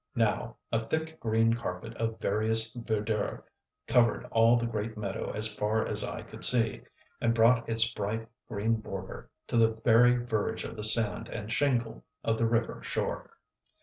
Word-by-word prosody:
Now - - 0
a 115 0 0
thick, 160 0 -3
green 115 0 +2
carpet 115 0 -5
of 115 -1 -2
various 110 +2 +1
verdure 110 -2 -2 0.4
covered 120 -3 +2
all 115 +1 +5
the 120 - -1
great 110 -1 -4
meadow 100 -2 -4
as 110 0 -1
far 105 +1 0
as - - 0
eye - - -5
could - - -10
see, 115 -3 +2 0.4
and 115 -1 +2
brought 115 +1 +4
its 115 0 +5
bright 110 +2 -3 0.2
green 110 +3 0
border 95 -3 -8 0.2
to - - -2
the 110 -1 +4
very 115 +2 +4
verge 120 -4 -2
of - - -7
the 105 - -5
sand 110 +1 +3
and 105 0 -6
shingle 125 -5 0 0.2
of 115 0 0
the 115 - +2
river 115 0 -1
shore. - - -4
115 Hz, 165 wpm, -29 LUFS, 110-115 Hz, 0.4 s, all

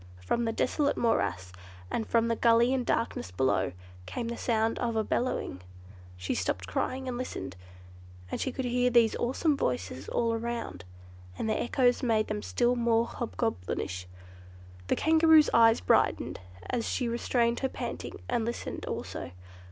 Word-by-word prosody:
From 235 - +1
the 225 - 0
desolate 285 +5 0
morass, 95 - 0 0.4
and 225 - -1
from 230 0 +2
the 230 - +1
gully 235 +2 +4
in 260 -2 0
darkness 230 - -1
below, 130 +9 +1 0.4
came 235 -2 -4
the 235 - -3
sound 225 -1 0
of 235 -2 -1
a 220 - +2
bellowing. 225 - -2 0.6
She 90 0 -2
stopped 95 0 -1
crying 260 - -2
and 245 -1 -3
listened, 95 - -5 0.8
and - - -2
could 265 0 -2
hear 250 0 +2
those 235 -2 +4
awesome 280 +5 +1
voices 125 - -3
all 230 -1 +1
around, 225 - -4 0.5
and - - -2
the 215 - 0
echoes 245 0 +2
made 225 -4 +1
them 210 0 -2
still 245 +2 +1
more 235 -1 +2
hobgoblinish. 90 - -3 0.8
The - - +2
Kangaroo's 320 -1 +5
eyes 225 -1 +6
brightened, 90 - +2 0.3
as 240 -2 -1
she 250 - -1
restrained 235 0 +1
her 265 - 0
panting, - - -5
and 240 -2 0
listened 235 +2 -4
also. - - -5
235 Hz, 150 wpm, -29 LUFS, 215-245 Hz, 0.8 s, eyes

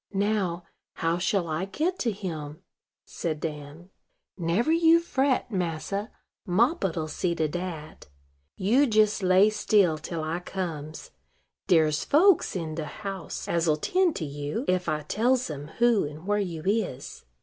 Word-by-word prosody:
Now, 195 -4 0 0.3
how 165 +1 -1
shall 185 -1 0
I 160 +4 -2
get 325 - -2
to 235 - 0
him?" 160 -7 -6 0.4
said 155 -3 -4
Dan. 150 +3 -7 0.4
"Never 180 - 0
you 330 0 +5
fret, 270 -7 0
massa: 185 +3 -2 0.3
Moppet'll 190 - +1
see 170 +3 -1
to 160 -1 0
dat. 165 -1 -6 0.5
You 245 +9 +3
jes 215 -1 +3
lay 190 +3 +5
still 195 -7 +2
till 160 +1 -5
I 160 +2 -2
comes. 160 -5 -6 0.6
Dere's 155 -3 +3
folks 345 - +4
in 165 -3 -3
de 155 -1 -4
house 195 +1 -6
as'll 165 -2 +2
tend 360 - +1
to 160 - -3
you, 145 - -4
ef 180 -1 +1
I 150 -1 -1
tells 245 - +1
em 145 0 -7
who 235 -3 +4
and 150 +3 -9
where 205 +1 +1
you 170 -6 -4
is." 195 - -2
180 Hz, 145 wpm, -27 LUFS, 155-215 Hz, 0.6 s, you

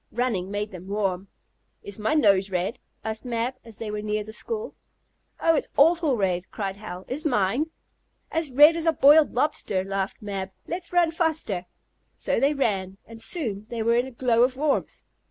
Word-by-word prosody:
Running 225 -7 -1
made 205 +1 -3
them 185 -1 -10
warm. 195 -2 -1 0.6
"Is 200 +1 -6
my 220 +8 +1
nose 200 -9 +4
red?" 185 +4 -2 0.2
asked 220 0 -3
Mab, 240 0 -2
when 230 -2 -11
they 220 -2 -5
were 210 0 -3
near 210 0 -1
the 220 +1 -10
school. 450 - -3 0.7
"Oh, 330 0 +3
it's - - -1
awful 315 -2 +4
red!" 185 -3 -1
cried 195 -2 -4
Hal. 185 -3 -8
"Is 285 +5 -3
mine?" 245 +3 +1 0.6
"As 325 -2 -1
red 295 +5 +7
as 335 0 -1
a 325 - +5
boiled 295 0 +6
lobster!" 240 -8 0
laughed 195 0 -3
Mab. 195 -2 -4 0.2
"Let's 345 0 -4
run 350 -2 +3
faster!" 315 - -1 0.5
So - - -1
they 285 +2 +2
ran, 195 -8 -1
and 225 0 -10
soon 225 - -2
they 230 -2 -3
were 230 +1 +3
in 245 +2 +1
a - - -9
glow 235 -1 +2
of 255 +1 +3
warmth. 295 0 -1
225 Hz, 185 wpm, -25 LUFS, 195-295 Hz, 0.7 s, red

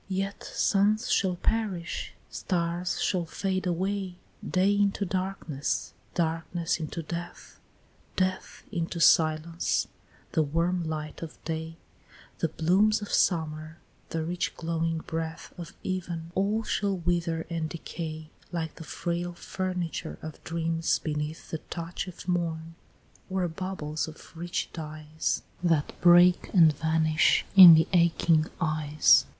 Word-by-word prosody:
"Yet 195 +1 -3
suns 215 +5 +2
shall 185 -2 +2
perish 190 -3 -2 0.2
stars 175 0 -1
shall 175 -3 0
fade 185 +2 -2
away 190 +1 -1 0.3
Day 190 +2 +2
into 200 0 +1
darkness 185 -6 -2 0.2
darkness 165 +1 -1
into 165 +1 -4
death 170 +2 -7 0.6
Death 185 0 -2
into 170 -2 -3
silence; 160 +1 +3 0.4
the 160 - +2
warm 165 +4 0
light 155 -1 -5
of 165 -2 -7
day, 160 0 -4 0.6
The 165 - +2
blooms 195 +7 +2
of 205 - -6
summer, 160 -2 0 0.3
the 165 -1 -2
rich 175 +2 -2
glowing 165 -1 -1
breath 160 0 -5
Of 175 0 -9
even 170 -3 -4
all 205 +4 +1
shall 200 -3 0
wither 170 -1 -1
and 165 -2 -2
decay, 160 -1 -6 0.2
Like 165 -3 -4
the - - -8
frail 175 +2 -3
furniture 180 - -4
of 155 -1 -8
dreams 165 0 0
beneath 150 0 -4
The 160 - -2
touch 170 +2 -5
of 180 0 -10
morn 165 -2 -1 0.6
or 185 -1 0
bubbles 160 -4 -4
of 160 +2 -12
rich 175 +1 -3
dyes 155 -1 -3 0.2
That 165 -4 +1
break 175 +1 +6
and 165 -4 +7
vanish 160 +1 +2
in 180 -4 +12
the 160 - +4
aching 170 -2 +4
eyes." 155 -3 +4
170 Hz, 125 wpm, -28 LUFS, 160-185 Hz, 0.6 s, in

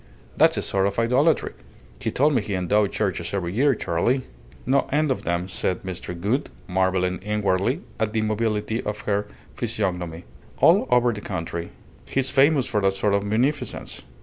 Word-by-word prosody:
That's - - +4
a - - -1
sort 95 0 +1
of 100 - -3
idolatry. 125 +8 +2 0.5
He - - -2
told 145 +3 +2
me 125 - +2
he 100 -1 -3
endowed 100 +3 +2
churches 95 -3 -2
every 90 -2 -2
year, 135 +4 +3
Charley." 115 +9 0 0.4
"No 135 +2 +2
end 150 0 +2
of 130 - -2
them," 85 +2 -1
said 95 -1 -2
Mr. 90 -2 -6
Gould, 115 +11 0 0.2
marvelling 95 0 +1
inwardly 105 - 0 0.2
at 110 -1 0
the 110 0 0
mobility 110 +1 -1
of 105 0 -4
her 105 0 -1 0.3
physiognomy. 90 -7 -3 0.3
"All - - +5
over 125 -1 +4
the 105 - -7
country. 85 -3 -4 0.4
He's 135 -1 0
famous 140 0 +4
for 105 -5 0
that 95 0 +2
sort 100 +1 +1
of 100 0 +2
munificence." 125 +5 -1
105 Hz, 170 wpm, -24 LUFS, 95-125 Hz, 0.5 s, All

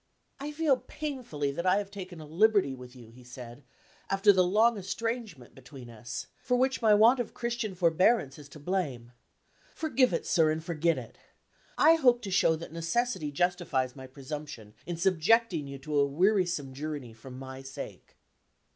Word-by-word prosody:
"I 290 +2 -5
feel 300 -3 +2
painfully 250 - -4
that 170 +6 -3
I 185 - +5
have 200 -1 -3
taken 185 -4 -8
a 155 - -9
liberty 190 -1 +3
with 125 -1 -11
you," 115 -3 -14
he 125 +2 -16
said, 125 +1 -11 0.5
"after 195 +1 +5
the 185 -1 +4
long 220 +6 +3
estrangement 205 - -4
between 130 -2 -12
us 115 +1 -6 0.2
for 250 -2 +1
which 260 +1 +1
my 220 -2 +4
want 230 +5 +6
of 245 - -4
Christian 235 -4 -3
forbearance 170 - +2
is 145 -1 -13
to 150 - -12
blame. 145 -8 -3 0.6
Forgive 265 -6 +2
it, 165 - -2
sir, 160 -3 +3
and 155 +1 -2
forget 165 -1 0
it. 120 -3 -9 0.6
I 325 +2 +6
hope 245 -5 +3
to 195 - -5
show 165 -3 +3
that 160 0 -9
necessity 165 0 -1
justifies 160 -6 0
my 130 -1 -9
presumption, 135 -5 -8
in 175 -1 -3
subjecting 185 -1 +2
you 140 0 -7
to 145 +2 -2
a 140 - +4
wearisome 175 -3 +1
journey 145 -4 -6
for 110 +4 -13
my 130 +1 -8
sake." 135 0 -9
165 Hz, 175 wpm, -29 LUFS, 135-215 Hz, 0.6 s, want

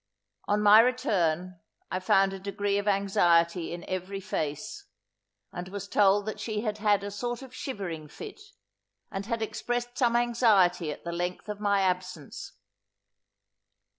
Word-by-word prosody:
On 210 +1 +1
my 210 +1 +9
return 185 -8 +1 0.3
I 185 - -1
found 195 +1 +3
a 195 - -6
degree 200 +1 -1
of 205 - -5
anxiety 175 -4 +2
in 175 0 -6
every 185 +1 -4
face, 150 -6 -4 0.7
and 175 +1 -5
was 200 0 -6
told 200 0 +3
that 215 - -4
she 215 -2 -2
had 215 -2 -3
had 205 -2 +2
a 205 - -4
sort 240 +4 -4
of 260 -1 -12
shivering 185 - -5
fit, 410 - -10 0.7
and 195 +1 -5
had 230 -2 -1
expressed 240 +3 -3
some 240 -3 +3
anxiety 215 -9 +3
at - - -9
the 170 - -4
length 175 +3 -3
of 210 -1 -4
my 200 -1 +2
absence. 180 -5 -3
200 Hz, 150 wpm, -28 LUFS, 180-220 Hz, 0.7 s, my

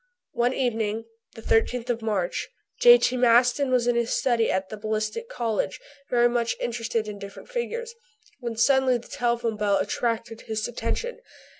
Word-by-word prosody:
One 245 +2 +1
evening, 225 -3 -1 0.3
the 225 - -10
13th 245 +2 +1
of 235 -1 -3
March, 200 -5 -2 0.3
J.T. 480 - +6
Maston 245 +3 +4
was 250 -2 +2
in 245 0 +2
his 235 0 0
study 235 -3 +2
at 190 0 -1
the 215 - -5
Ballistic 215 - -3
Cottage, 225 - -2 0.3
very 240 -1 +4
much 235 -1 0
interested 230 -2 -2
in 205 -1 -6
different 200 - -10
figures, 475 -1 -4 0.5
when 235 -2 -4
suddenly 260 +1 +4
the 240 - -13
telephone 235 -2 -1
bell 205 -1 +2
attracted 230 -1 -2
his 220 -2 -3
attention. 475 - -3
235 Hz, 155 wpm, -25 LUFS, 220-250 Hz, 0.5 s, J.T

